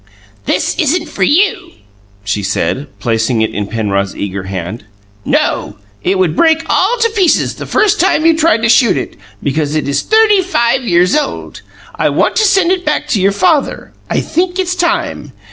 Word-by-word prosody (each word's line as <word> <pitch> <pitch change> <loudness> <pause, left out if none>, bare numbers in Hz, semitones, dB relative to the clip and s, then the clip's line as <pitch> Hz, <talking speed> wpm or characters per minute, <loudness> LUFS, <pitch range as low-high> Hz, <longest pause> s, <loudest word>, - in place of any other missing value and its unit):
"This 185 - 0
isn't 320 +1 0
for 200 - -8
you," 345 - +1 0.5
she 105 0 -2
said, 105 +8 -2
placing 115 -1 0
it 110 - -2
in 105 -1 -3
Penrod's 100 -3 -2
eager 100 -1 -4
hand. 95 +4 -6 0.4
"No. - - -1 0.3
It 190 +2 0
would 180 -4 +1
break 325 - +3
all 430 +6 +1
to 460 0 +2
pieces 385 -6 +1
the - - -8
first 425 - +2
time 325 -3 +2
you 330 -1 +5
tried 320 -7 +2
to - - +3
shoot 235 -1 +4
it, - - -5 0.3
because 145 +1 -1
it 155 - -1
is 140 - 0
thirty 435 -2 +3
five 255 -9 0
years 180 -2 +2
old. 300 -2 -3 0.3
I - - 0
want - - 0
to 435 - +3
send 385 -3 +3
it 370 -1 0
back 300 -2 -1
to 205 - +1
your 195 +1 +3
father. 310 - 0 0.2
I - - 0
think 355 +3 -1
it's 365 -1 -1
time. 340 - -2
265 Hz, 180 wpm, -13 LUFS, -, 0.5 s, you